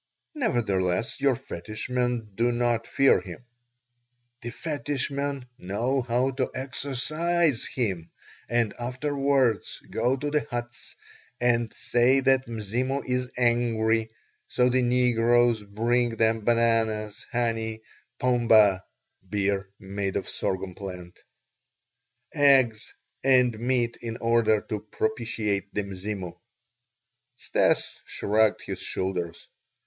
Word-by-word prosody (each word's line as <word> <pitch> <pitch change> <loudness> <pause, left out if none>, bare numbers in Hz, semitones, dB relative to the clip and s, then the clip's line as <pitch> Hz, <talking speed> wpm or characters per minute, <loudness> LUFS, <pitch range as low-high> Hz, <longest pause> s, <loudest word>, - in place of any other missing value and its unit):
"Nevertheless 110 - 0
your 140 -2 +3
fetish 110 0 -7
men 125 -3 -1
do 120 +4 +1
not 120 -1 0
fear 135 0 +4
him." 125 - -10 1.0
"The 120 - -5
fetish 145 0 -3
men 140 -1 -3
know 120 +8 -1
how 125 +2 +1
to 130 -1 -1
exorcise 140 +3 -1
him, 95 -10 -2 0.4
and 120 -2 +1
afterwards 135 -1 0
go 130 +2 +1
to 145 +2 -3
the 150 -1 0
huts 120 0 -6 0.4
and 120 -2 +2
say 125 +3 +2
that 135 0 +3
Mzimu 120 +5 -2
is 125 0 -1
angry; 115 -2 +2 0.4
so 125 0 +2
the 130 +1 +2
negroes 120 -1 +3
bring 115 +3 0
them 110 -1 +1
bananas, 115 -3 +1
honey, 115 -2 -1 0.4
pombe 115 -6 +4 0.5
(beer 100 -1 -1
made 100 -1 -4
of - - -2
sorghum 95 0 -3
plant), 90 -2 -9 1.1
eggs, 130 -6 +4 0.3
and 125 -4 +4
meat 120 -1 0
in 115 -1 -5
order 115 -2 +2
to 105 - -4
propitiate 110 -2 -2
the 105 - 0
Mzimu." 95 -2 -5 1.0
Stas - - 0
shrugged 110 +1 +1
his - - -5
shoulders. 90 -3 -4
120 Hz, 110 wpm, -26 LUFS, 110-125 Hz, 1.1 s, fear